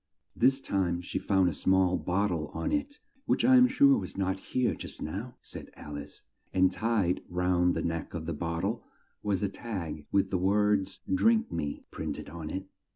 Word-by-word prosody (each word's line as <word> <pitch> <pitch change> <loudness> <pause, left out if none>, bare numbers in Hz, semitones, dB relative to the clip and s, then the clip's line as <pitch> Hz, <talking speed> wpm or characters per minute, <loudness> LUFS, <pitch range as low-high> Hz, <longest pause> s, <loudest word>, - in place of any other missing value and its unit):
This 135 +3 +4
time 95 -8 0
she 90 - -3
found 95 -2 +3
a 90 - 0
small 95 +3 +3
bot 100 +4 0
tle 80 -4 -2
on 290 - -1
it 290 -1 -1 0.3
("which - - +2
I 260 +1 +7
am 250 0 +8
sure 275 +2 +5
was - - -7
not 95 0 0
here 125 +5 0
just - - -7
now," 105 +10 -5
said - - -9
Al 75 -1 -8
ice), 75 0 -8 0.3
and 95 0 +4
tied 110 -6 +1
round 90 0 +2
the - - -1
neck 85 0 -3
of 80 -1 -4
the 85 - -2
bot 85 0 -3
tle 105 +5 -2 0.4
was 105 -1 0
a - - +3
tag 90 -9 -5
with 100 -1 +2
the 95 - +1
words 100 +1 +2
"Drink 225 - +3
me" 70 -1 -3
printed - - -5
on 80 -2 -6
it. 95 +3 -4
95 Hz, 195 wpm, -29 LUFS, 85-115 Hz, 0.4 s, am